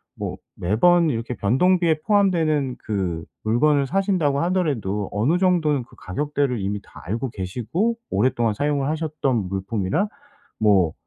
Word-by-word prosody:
뭐 - - -5 0.2
매번 165 - +3
이렇게 120 -1 -3
변동비에 160 - +2
포함되는 165 -10 +2
그 90 -6 -2 0.2
물건을 140 +5 +2
사신다고 180 -7 +1
하더라도 140 - 0
어느 125 +12 +2
정도는 165 -7 +2
그 - - -19
가격대를 140 +3 -2
이미 100 +1 -2
다 - - -15
알고 115 +8 -2
계시고 120 - -2
오랫동안 120 -3 +1
사용을 145 +3 0
하셨던 150 - -1
물품이나 100 - -1 0.5
뭐 100 -7 +3
135 Hz, 320 characters per minute, -23 LUFS, 105-165 Hz, 0.5 s, 매번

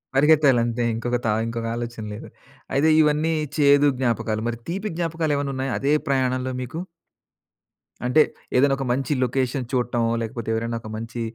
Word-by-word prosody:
పరిగెత్తాలంతే 135 -5 +4
ఇంకొక 120 +1 -1
త - - +2 0.2
ఇంకొక 115 0 -4
ఆలోచన 120 -2 -5
లేదు. - - -8 0.5
అయితే 145 +4 +3
ఇవన్నీ 155 +2 +2 0.2
చేదు 145 0 +5
జ్ఞాపకాలు. 115 -3 0
మరి 115 -1 -2
తీపి 200 +4 -3
జ్ఞాపకాలు 165 -3 -1
ఏమన్నా 140 -1 -2
ఉన్నాయా 130 0 -2
అదే 140 +2 +1
ప్రయాణంలో 130 -1 0
మీకు? 145 +7 -5 1.2
అంటే 150 +5 +5 0.4
ఏదైనా 135 +1 +4
ఒక 135 - -3
మంచి 135 +2 -1
లొకేషన్ 130 +1 -1
చూడటమో, 120 -2 +1
లేకపోతే 115 0 -5
ఎవరైనా 115 +1 -2
ఒక 110 - -9
మంచి 115 +1 -6
130 Hz, 150 wpm, -23 LUFS, 120-145 Hz, 1.2 s, చేదు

